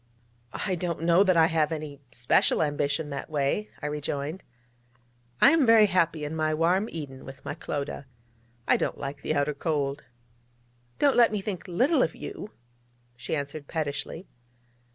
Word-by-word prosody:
'I 195 - -2
don't 170 -2 -2
know 170 +3 +5
that 185 -3 +3
I 160 - +7
have 160 -2 +1
any 150 -3 -5
special 125 +5 +2
ambition 145 0 -1
that 140 +2 -5
way,' 150 +8 -1
I - - -2
rejoined. 150 +3 -3 1.0
'I - - +7
am 325 -4 +4
very 225 -2 +7
happy 170 -5 +1
in 150 +2 -4
my 155 -1 0
warm 180 +7 +2
Eden 140 -5 -7
with 135 +1 -11
my - - -3
Clodagh. 145 -2 -5 0.6
I - - +5
don't - - -2
like 140 +1 -6
the 155 - -1
outer 145 +1 +1
Cold.' 145 -2 -2 0.9
'Don't 285 -2 +3
let 235 -2 +6
me 210 - -1
think 195 -3 -5
little 250 - +2
of - - 0
you!' 380 - -7 0.7
she 120 - -3
answered 145 0 -5
pettishly. 160 +3 -4
155 Hz, 160 wpm, -27 LUFS, 145-185 Hz, 1.0 s, I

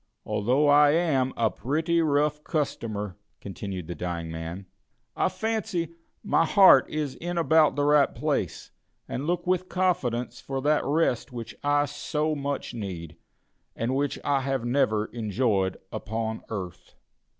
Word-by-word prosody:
Although 120 +8 +2
I 145 0 +6
am 145 -6 +2
a 115 -3 +2
pretty 155 - 0
rough 150 0 +1
customer," 105 - -3 0.2
continued 95 -4 -6
the 85 - -5
dying 85 -1 -4
man, 80 +4 -6 0.5
"I - - +2
fancy 190 -7 -2 0.3
my - - +3
heart 195 +3 +6
is 150 -3 -2
in 175 +1 -5
about 160 -2 +4
the 145 - +1
right 145 -1 +4
place, - - -2 0.4
and 140 +4 -4
look 175 0 -1
with 185 0 0
confidence 125 -10 -1
for 135 0 -4
that 150 +1 +3
rest 140 -4 0
which 115 -2 -7
I 145 0 +3
so 150 +2 -2
much 140 -2 -3
need, 90 -8 -6 0.6
and 120 +3 -1
which 140 0 0
I 140 -1 +2
have 135 -2 -2
never 115 -4 +2
enjoyed 105 -4 0
upon 110 +1 -3
earth." 95 -6 -7
135 Hz, 140 wpm, -26 LUFS, 110-150 Hz, 0.6 s, I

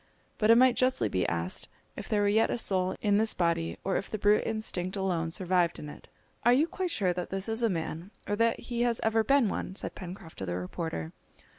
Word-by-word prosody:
But 215 - +2
it 230 - +8
might 255 0 +5
justly 255 - +2
be 95 -1 0
asked 85 +2 -2 0.3
if - - -8
there 205 -1 +2
were - - +3
yet 220 +2 +3
a - - -1
soul 185 -4 +1
in 205 -1 +3
this 220 0 +1
body, 170 -1 0
or 195 - 0
if - - -4
the 215 - -3
brute 205 +1 +3
instinct 200 -4 -2
alone 180 -4 -1
survived 175 -1 +1
in 150 - -7
it! - - -12 0.4
"Are 240 - +6
you 280 +5 +4
quite 365 +2 -3
sure 195 - 0
that 180 0 -4
this 195 +1 -3
is 225 +1 0
a 230 - +3
man, 165 0 -4 0.2
or 205 - 0
that 230 +1 +1
he 240 0 -3
has 240 -1 +2
ever 225 0 +2
been 275 -1 +3
one?" 190 -1 -4
said - - -4
Pencroft 180 -2 -9
to 95 - -3
the 90 - -2
reporter. 90 - -4
195 Hz, 235 wpm, -29 LUFS, 170-225 Hz, 0.4 s, it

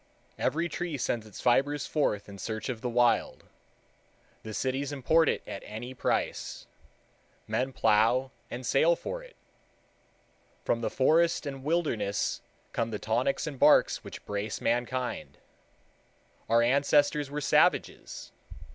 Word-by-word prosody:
Every 165 +2 0
tree 175 -3 -4
sends 115 -2 -2
its 105 - -10
fibers 140 +3 +2
forth 105 -9 0
in 100 -1 -10
search 110 +4 -4
of 120 -3 -4
the 125 - -2
Wild. 120 0 +2 1.0
The 110 - -8
cities 135 +5 -2
import 150 +3 +3
it - - -1
at 95 - -6
any 115 +4 -7
price. 130 - -2 0.8
Men 130 +1 -1
plow 115 +3 +3 0.2
and 125 +1 -6
sail 160 +8 +4
for - - -5
it. - - -15 1.3
From 115 - +1
the - - -1
forest 165 +5 +3
and 135 -2 -6
wilderness 145 -11 0 0.3
come 115 0 -1
the 110 - -3
tonics 110 - 0
and 145 -5 -6
barks - - +5
which - - -10
brace 105 0 -3
mankind. 125 +2 -2 1.1
Our 115 +1 +5
ancestors 145 +3 +3
were 145 +1 -3
savages. 145 - +1
130 Hz, 130 wpm, -29 LUFS, 115-145 Hz, 1.3 s, barks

